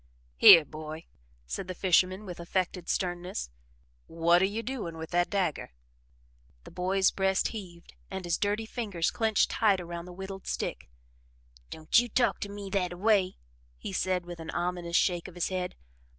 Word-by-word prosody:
"Here, 155 - +9
boy," 155 +2 -8 0.4
said 175 - -5
the 185 - -5
fisherman 185 +2 +2
with 180 -3 -8
affected 180 0 -2
sternness: 180 - -2 0.6
"What 170 +2 +3
are - - +5
you 210 +4 -3
doing 215 -10 -5
with 160 0 -7
that 175 0 +2
dagger?" 180 - -1 0.9
The - - -12
boy's 190 +2 +2
breast 190 0 +1
heaved 180 -6 -9 0.2
and 190 -1 -5
his 170 -1 0
dirty 210 +2 0
fingers 205 -8 -2
clenched 220 -3 +1
tight 205 -4 +3
around 170 -1 -6
the 180 - -10
whittled 195 +1 -8
stick. - - -4 0.8
"Don't 160 +8 +2
you 240 0 -1
talk 235 -2 +1
to 200 - -4
me 200 -1 -7
that 180 -3 0
a - - -9
way," 195 -2 +2 0.4
he 195 - -7
said 185 -1 0
with 175 -1 -8
an 165 0 -8
ominous 175 -1 -2
shake 175 -2 +1
of 185 - -12
his 175 - -1
head. 185 -1 -3
185 Hz, 170 wpm, -29 LUFS, 170-195 Hz, 0.9 s, Here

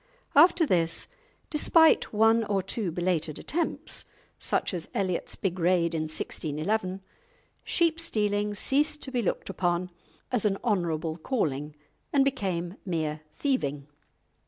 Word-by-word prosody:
After 335 +3 +6
this, 165 - +1 0.5
despite 320 +1 +5
one 225 +1 +4
or 200 -2 0
two 210 -2 -1
belated 170 -3 -1
attempts, 335 +4 -2 0.3
such - - 0
as 170 -2 -4
Elliot's 185 -3 -1
big 185 -2 -2
raid 170 -1 +2
in 155 -1 -1
1611, 185 +5 -2 0.6
sheep 330 -1 +2
stealing 210 -9 0
ceased 295 +8 +1
to 265 - -5
be 250 -2 0
looked 205 - -2
upon 175 0 -1 0.4
as 245 -4 +1
an 200 -2 +2
honourable 170 -7 0
calling, 150 - -2 0.4
and 275 -1 +4
became 185 -8 -2
mere 155 -4 -2
thieving. 145 - -1
190 Hz, 125 wpm, -28 LUFS, 170-245 Hz, 0.6 s, After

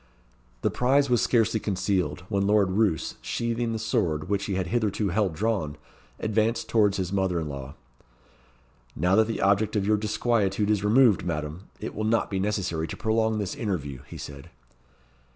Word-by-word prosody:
The - - +2
prize 135 +2 +2
was 120 - +4
scarcely 115 -2 +2
concealed 95 -2 -1
when 100 -1 0
Lord 100 -2 +3
Roos, 100 -5 0
sheathing 115 0 -2
the 110 - -2
sword 95 - -1
which 100 -1 0
he 100 - -2
had 95 -1 -1
hitherto 105 +1 0
held 95 -3 0
drawn, 95 -7 -1 0.4
advanced 110 +2 0
towards 105 -3 +3
his 95 0 -2
mother 95 -3 +1
in 80 - -3
law. 70 -2 -7 1.2
"Now 90 +2 +2
that 110 +1 +4
the 115 - -3
object 100 +3 +2
of 100 -2 +1
your 105 +1 +3
disquietude 105 -1 +1
is 105 -2 +1
removed, 110 0 +4
Madam, 80 +2 -4
it - - -5
will 110 - -3
not 110 0 +1
be 95 - -1
necessary 95 -5 -1
to - - -7
prolong 110 -1 +1
this 100 -3 -2
interview," 90 - -3
he - - -9
said. 70 -1 -9
105 Hz, 170 wpm, -26 LUFS, 90-110 Hz, 1.2 s, was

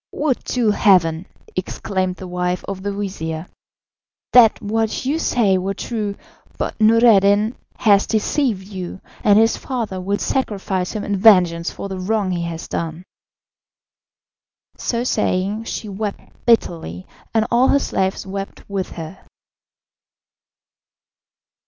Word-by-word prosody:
"Would 290 -4 -1
to 235 -4 +1
heaven," 180 -5 +3 0.3
exclaimed 185 0 -2
the 185 - -9
wife 180 0 -2
of 195 -1 -5
the 200 +1 -2
vizir, 180 -5 -4 0.9
"that 235 -3 +7
what 220 +3 -1
you 295 +5 0
say 205 -11 +2
were 195 +2 -2
true; 210 -4 -3 0.4
but - - -2
Noureddin 215 -1 +5 0.2
has 200 -3 +4
deceived 220 -2 0
you, 190 -2 -6 0.2
and 205 -1 +5
his 225 +1 +4
father 225 -8 -4
will 200 +2 -1
sacrifice 195 -8 -2
him 215 - -3
in 200 -1 -1
vengeance 180 -5 +5
for - - -6
the 190 -1 -5
wrong 200 0 0
he 175 -1 -1
has 165 -1 -6
done." 165 +1 -4 1.7
So 235 -1 -2
saying, 205 -2 0
she 220 - -5
wept 205 +1 -4 0.3
bitterly, 165 - +1 0.3
and 220 -1 +2
all 245 +2 +4
her - - +4
slaves 190 -8 -1
wept 195 +1 -6
with 195 -2 -3
her. 165 +3 -8
200 Hz, 125 wpm, -20 LUFS, 185-220 Hz, 1.7 s, that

